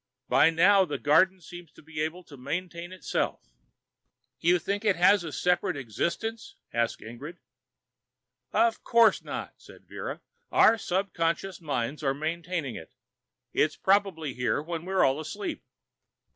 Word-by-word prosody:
"By 155 Hz, -, +5 dB
now, 190 Hz, +4 st, +5 dB
the 150 Hz, -6 st, -3 dB
garden 185 Hz, +6 st, +3 dB
seems 175 Hz, 0 st, -11 dB
to -, -, -17 dB
be 155 Hz, 0 st, -6 dB
able 165 Hz, +4 st, -3 dB
to 150 Hz, -, -13 dB
maintain 170 Hz, +6 st, -5 dB
itself." 185 Hz, -, -2 dB, 1.0 s
"You 175 Hz, +2 st, +4 dB
think 200 Hz, +5 st, -3 dB
it 205 Hz, -3 st, +3 dB
has 180 Hz, +2 st, +5 dB
a 160 Hz, -, -5 dB
separate 180 Hz, 0 st, 0 dB
existence?" 170 Hz, -, -3 dB, 0.2 s
asked 115 Hz, -1 st, -1 dB
Ingrid. 135 Hz, +10 st, -9 dB, 1.1 s
"Of 230 Hz, -1 st, +2 dB
course 230 Hz, -1 st, +4 dB
not," -, -, -6 dB
said -, -, -16 dB
Vera. -, -, -6 dB, 0.3 s
"Our 225 Hz, +1 st, +5 dB
subconscious 180 Hz, -1 st, -1 dB
minds 140 Hz, -2 st, -2 dB
are 135 Hz, -2 st, 0 dB
maintaining 165 Hz, -2 st, -3 dB
it. 80 Hz, -, -10 dB, 0.6 s
It's 150 Hz, 0 st, +2 dB
probably 190 Hz, -7 st, +1 dB
here 125 Hz, +2 st, 0 dB
when 165 Hz, +2 st, -5 dB
we're 190 Hz, 0 st, +2 dB
all 135 Hz, +2 st, +1 dB
asleep." 160 Hz, +7 st, -5 dB
170 Hz, 140 wpm, -28 LUFS, 150-185 Hz, 1.1 s, By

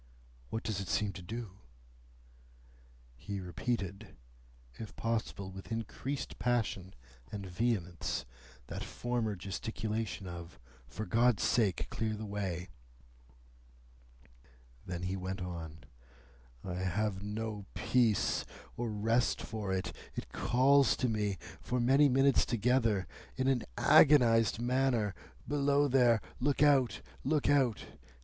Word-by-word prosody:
"What 110 Hz, -, -3 dB
does 100 Hz, -3 st, -2 dB
it 95 Hz, -, -6 dB
seem 105 Hz, -2 st, 0 dB
to 95 Hz, -, -8 dB
do?" 105 Hz, +1 st, -7 dB, 1.6 s
He 100 Hz, +10 st, -5 dB
repeated, 100 Hz, +2 st, -4 dB, 0.6 s
if 110 Hz, -2 st, -7 dB
possible 110 Hz, -4 st, -2 dB
with 95 Hz, +4 st, -10 dB
increased 125 Hz, +5 st, -4 dB
passion 110 Hz, -6 st, -1 dB, 0.4 s
and 100 Hz, -2 st, -5 dB
vehemence, 90 Hz, -2 st, -1 dB, 0.4 s
that -, -, -5 dB
former 120 Hz, -3 st, -2 dB
gesticulation 105 Hz, +2 st, -4 dB
of, 85 Hz, -1 st, -8 dB, 0.3 s
"For 105 Hz, +11 st, -5 dB
God's 120 Hz, 0 st, +3 dB
sake, 105 Hz, -7 st, +2 dB
clear 110 Hz, -1 st, -1 dB
the 110 Hz, +1 st, -6 dB
way!" 95 Hz, -4 st, -3 dB, 2.2 s
Then 90 Hz, -1 st, -4 dB
he 95 Hz, +1 st, -1 dB
went 95 Hz, +1 st, -4 dB
on. 85 Hz, -3 st, -6 dB, 0.8 s
"I 90 Hz, -2 st, -4 dB
have 95 Hz, +2 st, -1 dB
no 105 Hz, 0 st, -4 dB
peace 120 Hz, -5 st, +2 dB, 0.3 s
or 120 Hz, -1 st, -2 dB
rest 115 Hz, +3 st, +1 dB
for 105 Hz, -4 st, -4 dB
it. 95 Hz, 0 st, -2 dB, 0.2 s
It -, -, -5 dB
calls 135 Hz, +3 st, +4 dB
to 125 Hz, -, +1 dB
me, 105 Hz, -3 st, 0 dB, 0.2 s
for 125 Hz, -, -1 dB
many 135 Hz, +4 st, +5 dB
minutes 135 Hz, +1 st, +4 dB
together, 115 Hz, -4 st, +2 dB, 0.3 s
in 130 Hz, 0 st, 0 dB
an 130 Hz, -3 st, +2 dB
agonised 115 Hz, -7 st, +6 dB
manner, 120 Hz, -4 st, +1 dB, 0.3 s
'Below 145 Hz, 0 st, +3 dB
there! 120 Hz, -4 st, +4 dB, 0.2 s
Look 145 Hz, +2 st, +2 dB
out! 140 Hz, -4 st, +4 dB, 0.2 s
Look 150 Hz, +1 st, +1 dB
out! 135 Hz, -6 st, +2 dB
110 Hz, 115 wpm, -33 LUFS, 95-125 Hz, 2.2 s, agonised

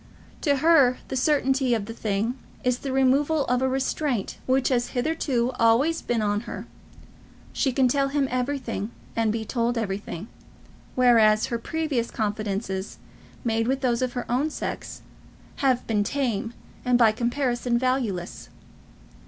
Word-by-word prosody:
To 285 Hz, -3 st, +3 dB
her 280 Hz, -4 st, +5 dB
the -, -, -3 dB
certainty 265 Hz, -2 st, +2 dB
of 215 Hz, -3 st, -3 dB
the 225 Hz, -, -7 dB
thing 215 Hz, +1 st, -1 dB, 0.3 s
is 250 Hz, -1 st, +1 dB
the 275 Hz, -, -4 dB
removal 275 Hz, +3 st, +2 dB
of 250 Hz, +1 st, +1 dB
a 265 Hz, -, +2 dB
restraint 265 Hz, -3 st, -1 dB
which 260 Hz, 0 st, +2 dB
has 245 Hz, -2 st, +1 dB
hitherto 255 Hz, -3 st, 0 dB
always 245 Hz, +9 st, +3 dB
been 235 Hz, -2 st, -1 dB
on 205 Hz, 0 st, +1 dB
her. -, -, -6 dB, 0.9 s
She 265 Hz, -, +1 dB
can 260 Hz, 0 st, +3 dB
tell 275 Hz, +2 st, +2 dB
him 275 Hz, 0 st, 0 dB
everything, 250 Hz, -4 st, -2 dB, 0.3 s
and 225 Hz, -1 st, +2 dB
be 220 Hz, 0 st, -3 dB
told 240 Hz, +1 st, 0 dB
everything, 200 Hz, -3 st, -4 dB, 0.7 s
whereas 225 Hz, -4 st, +5 dB
her 235 Hz, -, 0 dB
previous 285 Hz, -3 st, -2 dB
confidences, 205 Hz, -2 st, -3 dB, 0.5 s
made 225 Hz, -1 st, 0 dB
with 265 Hz, +1 st, 0 dB
those 245 Hz, -2 st, +1 dB
of 255 Hz, -1 st, -1 dB
her 245 Hz, -2 st, -3 dB
own 260 Hz, +6 st, +1 dB
sex, -, -, -5 dB, 0.5 s
have 260 Hz, -3 st, +1 dB
been 210 Hz, -2 st, +1 dB
tame, 235 Hz, -3 st, -2 dB, 0.3 s
and 250 Hz, -1 st, +3 dB
by 230 Hz, -3 st, +6 dB
comparison 240 Hz, +1 st, 0 dB
valueless. 235 Hz, -8 st, -2 dB
245 Hz, 145 wpm, -25 LUFS, 225-270 Hz, 0.9 s, by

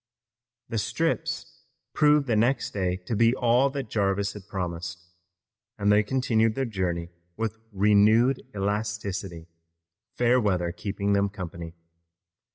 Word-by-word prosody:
The 115 Hz, -, -2 dB
strips 120 Hz, +11 st, -2 dB, 0.3 s
proved 150 Hz, -1 st, +4 dB
the 120 Hz, -4 st, +1 dB
next 120 Hz, +4 st, +1 dB
day 95 Hz, -3 st, 0 dB
to 110 Hz, -, -2 dB
be 115 Hz, +3 st, +4 dB
all 125 Hz, +2 st, +3 dB
that 135 Hz, -3 st, -5 dB
Jarvis 100 Hz, -1 st, 0 dB
had 105 Hz, -2 st, -11 dB
promised, 90 Hz, -3 st, -4 dB, 0.8 s
and 105 Hz, -1 st, +2 dB
they 105 Hz, +1 st, +5 dB
continued 115 Hz, -2 st, +1 dB
their 135 Hz, -, 0 dB
journey 90 Hz, -6 st, -2 dB, 0.3 s
with 115 Hz, 0 st, -3 dB
renewed 105 Hz, +5 st, +4 dB
elasticity, 100 Hz, -4 st, -3 dB, 0.7 s
fair 125 Hz, +1 st, +3 dB
weather 90 Hz, -5 st, 0 dB
keeping 100 Hz, +3 st, -2 dB
them 100 Hz, 0 st, +2 dB
company. 85 Hz, -3 st, -7 dB
105 Hz, 125 wpm, -26 LUFS, 95-115 Hz, 0.8 s, they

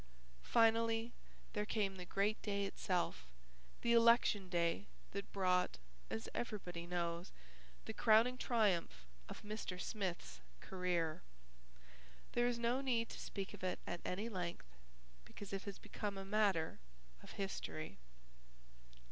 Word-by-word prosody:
Finally 225 Hz, -, +3 dB, 0.4 s
there 210 Hz, -, 0 dB
came 210 Hz, -2 st, 0 dB
the 180 Hz, -, -6 dB
great 205 Hz, +4 st, +1 dB
day 200 Hz, -1 st, 0 dB
itself, 175 Hz, -, -1 dB, 0.5 s
the 235 Hz, -, +3 dB
Election 230 Hz, -4 st, +5 dB
Day 170 Hz, +2 st, +1 dB, 0.2 s
that 200 Hz, 0 st, -5 dB
brought, 180 Hz, -2 st, +2 dB, 0.3 s
as 110 Hz, +1 st, -3 dB
everybody 180 Hz, -7 st, -4 dB
knows, 170 Hz, 0 st, -1 dB, 0.5 s
the -, -, -4 dB
crowning 225 Hz, +3 st, +5 dB
triumph 195 Hz, -, +1 dB, 0.2 s
of -, -, -8 dB
Mr. 210 Hz, -3 st, -4 dB
Smith's 180 Hz, -, -3 dB, 0.2 s
career. 175 Hz, -, -1 dB, 1.1 s
There 240 Hz, 0 st, +3 dB
is 245 Hz, -1 st, +1 dB
no 235 Hz, +3 st, +1 dB
need 235 Hz, -4 st, +1 dB
to -, -, -7 dB
speak 195 Hz, -2 st, -4 dB
of -, -, -10 dB
it 185 Hz, -1 st, 0 dB
at 175 Hz, -, -4 dB
any 200 Hz, +5 st, -2 dB
length, 180 Hz, -, -3 dB, 0.6 s
because 200 Hz, -, -9 dB
it 195 Hz, -, -3 dB
has 200 Hz, -2 st, -5 dB
become 205 Hz, -2 st, -4 dB
a 195 Hz, -, -5 dB
matter 195 Hz, -5 st, +2 dB, 0.4 s
of -, -, -11 dB
history. 175 Hz, -, -4 dB
195 Hz, 130 wpm, -39 LUFS, 175-225 Hz, 1.1 s, Election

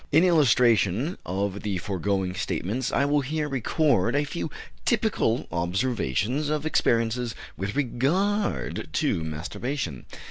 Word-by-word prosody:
In 160 Hz, +4 st, +6 dB
illustration 125 Hz, -, +3 dB
of 100 Hz, +2 st, -2 dB
the 100 Hz, -3 st, -2 dB
foregoing 95 Hz, 0 st, -1 dB
statements 100 Hz, +6 st, -2 dB
I 140 Hz, -, +2 dB
will 145 Hz, 0 st, +2 dB
here 150 Hz, +3 st, -2 dB
record 135 Hz, -, +1 dB
a 145 Hz, -, +3 dB
few 155 Hz, +2 st, -4 dB, 0.3 s
typical 215 Hz, -, +1 dB
observations 105 Hz, -, 0 dB
of 150 Hz, 0 st, -1 dB
experiences 115 Hz, -4 st, +1 dB, 0.2 s
with 95 Hz, +2 st, -4 dB
regard 160 Hz, -, 0 dB
to 80 Hz, -, +1 dB
masturbation. 85 Hz, -, -4 dB
120 Hz, 115 wpm, -26 LUFS, 95-145 Hz, 0.3 s, In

